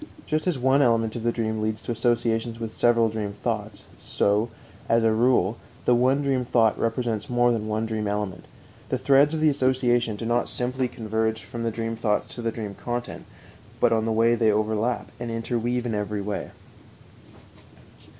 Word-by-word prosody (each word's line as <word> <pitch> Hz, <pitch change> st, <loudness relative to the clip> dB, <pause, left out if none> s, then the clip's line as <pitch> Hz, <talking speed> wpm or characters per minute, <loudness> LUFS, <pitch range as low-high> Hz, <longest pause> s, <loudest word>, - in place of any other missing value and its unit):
Just 155 Hz, +3 st, -1 dB
as 175 Hz, -6 st, +1 dB
one 130 Hz, +2 st, +3 dB
element 115 Hz, -3 st, +2 dB
of 120 Hz, -, -4 dB
the 120 Hz, +1 st, +1 dB
dream 110 Hz, -2 st, -2 dB
leads 110 Hz, 0 st, -1 dB
to -, -, -4 dB
associations 115 Hz, -1 st, 0 dB
with 115 Hz, -1 st, -5 dB
several 115 Hz, -1 st, +3 dB
dream 105 Hz, -2 st, -3 dB
thoughts, 110 Hz, -2 st, -4 dB, 0.2 s
so, 105 Hz, +3 st, +1 dB, 0.4 s
as 115 Hz, 0 st, +4 dB
a 115 Hz, -, +4 dB
rule, 115 Hz, -3 st, +2 dB, 0.3 s
the 125 Hz, -, +5 dB
one 130 Hz, +4 st, +3 dB
dream 135 Hz, -2 st, +1 dB
thought 115 Hz, -3 st, +3 dB
represents 115 Hz, -2 st, -1 dB
more 120 Hz, 0 st, +3 dB
than 110 Hz, -2 st, -1 dB
one 110 Hz, +1 st, -1 dB
dream 110 Hz, -2 st, -2 dB
element. 100 Hz, -3 st, -3 dB, 0.4 s
The 130 Hz, -, 0 dB
threads 140 Hz, +4 st, +4 dB
of 155 Hz, -, -2 dB
the 155 Hz, -, +5 dB
association 125 Hz, -4 st, +1 dB
do 115 Hz, -, -6 dB
not 120 Hz, +1 st, +1 dB
simply 125 Hz, +1 st, -1 dB
converge 110 Hz, -1 st, -2 dB
from 120 Hz, -, -7 dB
the 115 Hz, -, 0 dB
dream 115 Hz, 0 st, -3 dB
thoughts 110 Hz, -2 st, -1 dB
to 120 Hz, -, -6 dB
the 115 Hz, -1 st, -1 dB
dream 105 Hz, -3 st, -6 dB
content, 120 Hz, +3 st, -5 dB, 0.5 s
but 115 Hz, -, +4 dB
on 110 Hz, -1 st, +1 dB
the 115 Hz, -, 0 dB
way 115 Hz, +1 st, +3 dB
they 115 Hz, -2 st, +3 dB
overlap 110 Hz, +3 st, -1 dB
and 120 Hz, -1 st, -4 dB
interweave 120 Hz, +1 st, -2 dB
in 115 Hz, -, -2 dB
every 105 Hz, 0 st, -2 dB
way. 100 Hz, -1 st, -4 dB
115 Hz, 185 wpm, -25 LUFS, 110-120 Hz, 0.5 s, the